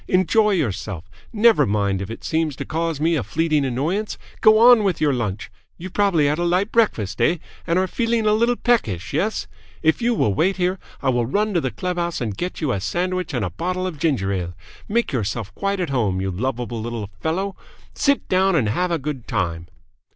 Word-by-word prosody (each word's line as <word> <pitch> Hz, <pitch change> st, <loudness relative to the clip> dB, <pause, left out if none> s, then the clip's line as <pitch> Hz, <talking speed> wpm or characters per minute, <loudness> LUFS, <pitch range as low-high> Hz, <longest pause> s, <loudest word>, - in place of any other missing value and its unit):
Enjoy 200 Hz, +4 st, +3 dB
yourself! 100 Hz, -, -2 dB, 0.2 s
Never 225 Hz, 0 st, +4 dB
mind 100 Hz, -2 st, 0 dB
if 100 Hz, -, -5 dB
it 115 Hz, -, -8 dB
seems 160 Hz, -3 st, 0 dB
to -, -, -6 dB
cause 165 Hz, -1 st, -2 dB
me 165 Hz, +3 st, +2 dB
a 150 Hz, -, 0 dB
fleeting 155 Hz, +2 st, 0 dB
annoyance. 155 Hz, -, -1 dB, 0.2 s
Go 215 Hz, 0 st, +7 dB
on 235 Hz, -1 st, +7 dB
with 190 Hz, -5 st, 0 dB
your 150 Hz, -2 st, +2 dB
lunch! 105 Hz, -5 st, -3 dB, 0.3 s
You 185 Hz, +2 st, -8 dB
probably 195 Hz, -7 st, +2 dB
had 150 Hz, +3 st, +1 dB
a -, -, 0 dB
light 180 Hz, +5 st, +1 dB
breakfast, 110 Hz, -, +1 dB
eh, 170 Hz, +9 st, +3 dB, 0.3 s
and 170 Hz, +1 st, +2 dB
are 185 Hz, -, +3 dB
feeling 230 Hz, +3 st, 0 dB
a 210 Hz, -, +4 dB
little 235 Hz, +3 st, +2 dB
peckish, 115 Hz, -, 0 dB
yes? 200 Hz, +9 st, 0 dB, 0.4 s
If 160 Hz, +8 st, +2 dB
you 235 Hz, 0 st, +2 dB
will 105 Hz, -, +2 dB
wait 185 Hz, -, +1 dB
here, 185 Hz, +1 st, 0 dB, 0.2 s
I -, -, +2 dB
will 120 Hz, -2 st, +1 dB
run 210 Hz, -, 0 dB
to 170 Hz, -, +2 dB
the 130 Hz, -, -1 dB
clubhouse 175 Hz, -, -2 dB
and 110 Hz, -5 st, -3 dB
get 180 Hz, -, -4 dB
you 150 Hz, -5 st, 0 dB
a 100 Hz, -, -1 dB
sandwich 180 Hz, -, -2 dB
and 120 Hz, -6 st, -1 dB
a 90 Hz, -, -4 dB
bottle 185 Hz, -, -2 dB
of 170 Hz, -6 st, -5 dB
ginger 130 Hz, -, +1 dB
ale. 90 Hz, -2 st, -3 dB, 0.3 s
Make 235 Hz, +3 st, +1 dB
yourself 110 Hz, -3 st, -3 dB
quite 200 Hz, -, -2 dB
at 175 Hz, -6 st, -2 dB
home, 105 Hz, -8 st, 0 dB
you 95 Hz, 0 st, -2 dB
lovable 120 Hz, +3 st, -3 dB
little 110 Hz, -3 st, -5 dB
fellow! 185 Hz, -, -2 dB, 0.4 s
Sit 280 Hz, -1 st, +1 dB
down 190 Hz, 0 st, +3 dB
and 120 Hz, -10 st, +2 dB
have 180 Hz, +12 st, 0 dB
a 170 Hz, -, +1 dB
good 140 Hz, -4 st, -5 dB
time!" 85 Hz, -5 st, -2 dB
160 Hz, 210 wpm, -22 LUFS, 115-190 Hz, 0.4 s, Go